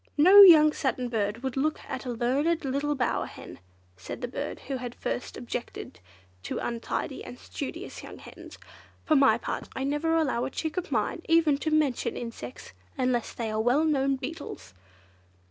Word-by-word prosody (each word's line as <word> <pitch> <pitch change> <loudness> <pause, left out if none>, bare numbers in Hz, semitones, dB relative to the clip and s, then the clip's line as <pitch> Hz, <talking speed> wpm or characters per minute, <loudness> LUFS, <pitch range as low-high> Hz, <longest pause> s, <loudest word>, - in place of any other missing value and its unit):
No 375 +7 +9
young 310 -5 +9
Satin 255 -3 -2
Bird 220 +1 -2
would 265 -2 -3
look 300 +3 0
at 260 - -5
a - - -3
learned 275 +8 0
little 280 +2 -1
bower 250 -3 -1
hen, - - -11 0.4
said 95 - -8
the 245 - -2
bird 280 +4 -5
who 270 - -4
had 245 -1 -6
first - - -4
objected 240 - -6 0.4
to - - -4
untidy 235 -1 -3
and - - -9
studious - - -7
young - - -10
hens. - - -12 0.5
"For 310 - +3
my 275 -1 +5
part, - - -5
I 265 - -2
never 295 +4 0
allow 270 -7 0
a - - -3
chick 315 +2 -4
of 365 - -4
mine 340 - -1
even 320 -4 +4
to 315 - -1
mention 305 -5 +1
insects, 230 - -8 0.2
unless 250 -2 0
they 225 -2 -3
are 215 0 0
well 250 +7 +3
known 275 -3 +2
beetles!" 270 - -7
270 Hz, 175 wpm, -27 LUFS, 240-305 Hz, 0.5 s, No